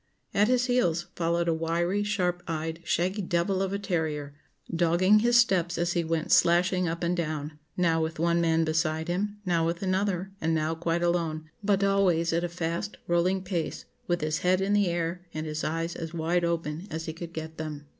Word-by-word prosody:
At 205 +1 +4
his 250 0 +3
heels 175 -10 +1
followed 170 0 0
a 165 - +3
wiry, 170 +4 0
sharp 180 -4 0
eyed, 160 0 -3
shaggy 185 +5 0
devil 175 +1 0
of 190 -1 -1
a 200 - -1
terrier, 160 -7 -2 0.4
dogging 175 +5 +4
his 240 +2 +4
steps 180 -7 +3
as 175 0 0
he 170 - +1
went 165 -1 -2
slashing 180 +1 +4
up 170 +1 -3
and 175 +1 +1
down, 155 -3 -3 0.2
now 165 -2 +2
with 160 +1 -2
one 170 +1 +2
man 165 -1 +3
beside 160 0 0
him, 205 +4 -1
now 170 -2 +2
with 170 +3 -1
another, 190 0 0
and 160 0 +1
now 155 +1 0
quite 170 +1 -1
alone, 160 -3 -1
but 200 -1 +2
always 185 -4 +2
at 170 +1 +1
a 175 - -1
fast, 170 +4 -3
rolling 180 +2 +1
pace, 180 -4 -3 0.2
with 175 0 0
his 155 0 0
head 185 +1 +2
in 195 +1 +1
the 205 -2 +3
air, 170 +1 -2
and 155 0 -3
his 155 0 -3
eyes 165 +2 -2
as 165 0 -6
wide 170 +2 +1
open 170 +1 -2
as 160 +1 -4
he 160 - -4
could 170 +1 -8
get 160 -1 -7
them. 150 -2 -5
170 Hz, 200 wpm, -28 LUFS, 160-185 Hz, 0.4 s, At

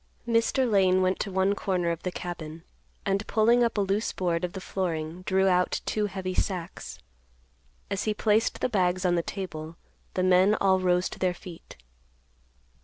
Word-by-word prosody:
Mr. 235 +3 +2
Lane 185 -3 +3
went 185 +1 +1
to 200 - -3
one 190 +1 +2
corner 180 -4 -1
of 170 - -4
the 180 - -3
cabin, 165 -3 -7 0.4
and, 200 +1 0
pulling 235 +3 +4
up 230 -2 0
a - - +3
loose 200 +3 0
board 175 -2 -1
of 180 0 -2
the 190 - -5
flooring, 170 -3 -3
drew 190 0 +3
out 180 -1 +2
two 210 -1 0
heavy 190 -2 -4
sacks. 180 - -3 0.9
As 200 0 -1
he 215 - +1
placed 215 +1 +1
the - - +2
bags 185 -5 +1
on 180 - +3
the 170 - +2
table, 165 -4 -6 0.4
the 185 - +1
men 185 +3 +5
all 190 -1 +3
rose 180 -1 +2
to - - -10
their 180 -1 +1
feet. 175 -1 -12
185 Hz, 180 wpm, -27 LUFS, 180-200 Hz, 0.9 s, men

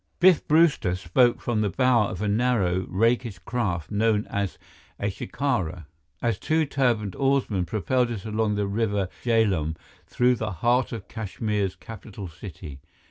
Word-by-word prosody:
Biff 180 -2 +5
Brewster 150 - +3
spoke 120 +8 +2
from 115 -3 0
the 105 - +1
bow 125 -2 +3
of 95 +2 -5
a - - 0
narrow, 100 -5 +1
rakish 115 +1 +1
craft 90 -5 -3
known 105 0 +2
as 100 -2 -2 0.4
a 100 0 -1
shikara, 95 - -2 0.4
as 115 -2 0
two 160 0 +1
turbaned 120 -8 0
oarsmen 135 -9 +1
propelled 120 +5 0
it 115 -4 -5
along 110 -1 0
the 105 0 0
River 100 -2 -1
Jhelum 100 -10 +2 0.3
through 125 0 +2
the 110 -2 -3
heart 120 +8 +1
of 105 -6 -6
Kashmir's 105 -2 -2
capital 105 -3 -9
city. 80 -4 -9
110 Hz, 145 wpm, -25 LUFS, 95-120 Hz, 0.4 s, Biff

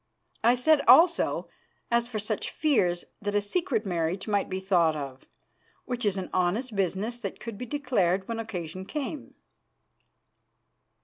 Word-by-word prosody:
I 240 +2 +5
said 295 +4 +4
also, 330 +7 +5 0.4
as 235 0 +2
for 235 -3 -4
such 215 0 -2
fears, 185 - +1 0.2
that 205 0 -2
a - - +5
secret 225 - -1
marriage 175 +1 -2
might 205 -2 0
be 190 0 -2
thought 175 -5 +2
of, 135 -3 -7 0.6
which 245 -2 -3
is 195 -1 0
an 185 - -5
honest 205 +7 0
business 200 +5 -1
that - - -5
could 230 -2 -6
be 250 +4 -7
declared 200 -10 0
when 230 -1 -3
occasion 185 -5 -5
came." 295 +6 -5
205 Hz, 145 wpm, -27 LUFS, 185-245 Hz, 0.6 s, I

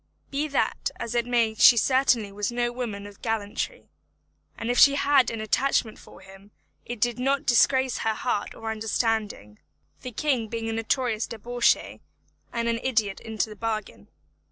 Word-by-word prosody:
Be 285 +2 -1
that 280 - -1
as 235 0 -4
it 240 0 0
may 235 -3 +2
she 235 +2 +7
certainly 250 -4 +2
was 205 +3 -3
no 240 0 0
a - - -9
woman 220 -5 -5
of 205 0 -13
gallantry, 225 - -3 0.7
and 230 +1 -2
if 245 - +1
she 280 -1 +7
had 280 -2 +3
an 225 - -5
attachment 225 0 0
for - - -15
him 195 +1 -15 0.4
it 240 -1 -5
did 240 +2 0
not 270 +2 0
disgrace 260 +1 +3
her 220 -1 0
heart 215 -4 -2
or 225 0 -5
understanding, 220 - -2 0.4
the 250 - -6
king 245 -2 0
being 225 0 -4
a - - -2
notorious 225 0 -1
debauchee 235 +2 0 0.5
and 235 0 -2
an 230 0 0
idiot 220 -6 0
into 220 -1 -3
the 215 - -10
bargain. 215 0 -5
230 Hz, 170 wpm, -25 LUFS, 215-250 Hz, 0.7 s, she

